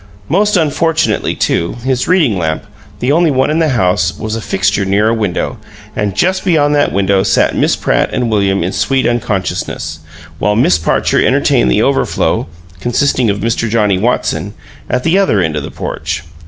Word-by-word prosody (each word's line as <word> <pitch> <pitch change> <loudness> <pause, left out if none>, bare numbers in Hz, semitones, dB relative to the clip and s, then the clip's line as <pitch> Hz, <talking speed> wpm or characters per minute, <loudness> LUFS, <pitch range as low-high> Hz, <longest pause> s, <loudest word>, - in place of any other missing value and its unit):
Most 205 +4 +2
unfortunately, 160 0 0
too, 85 - 0
his 130 -1 -1
reading 165 - +3
lamp, 80 +3 -2 0.4
the 125 - +1
only 165 +2 +3
one 130 +1 +1
in 155 - +1
the 160 -2 +2
house, 90 - +1
was 110 0 -4
a 115 - -4
fixture 100 0 0
near 100 +3 +2
a - - +1
window, 110 +2 -2 0.4
and 105 -2 -2
just 185 - +1
beyond 150 -6 +2
that 145 0 +2
window 100 0 +2
sat 95 -1 +1
Miss - - +2
Pratt - - 0
and 120 -2 -1
William 100 -3 +1
in 90 - -2
sweet 135 +4 0
unconsciousness, 95 -8 -2 0.4
while 105 +1 +1
Miss 90 -7 +3
Parcher 80 - +1
entertained 65 - +2
the 60 - +2
overflow - - 0 0.3
(consisting 120 +1 +1
of 100 0 -1
Mr. 115 0 -1
Johnnie 105 -4 +1
Watson) 120 +5 -1 0.3
at 125 +1 -1
the 170 +4 +2
other 190 - +2
end 80 -4 0
of 75 - -2
the - - -6
porch. - - -5
110 Hz, 180 wpm, -14 LUFS, 95-145 Hz, 0.4 s, reading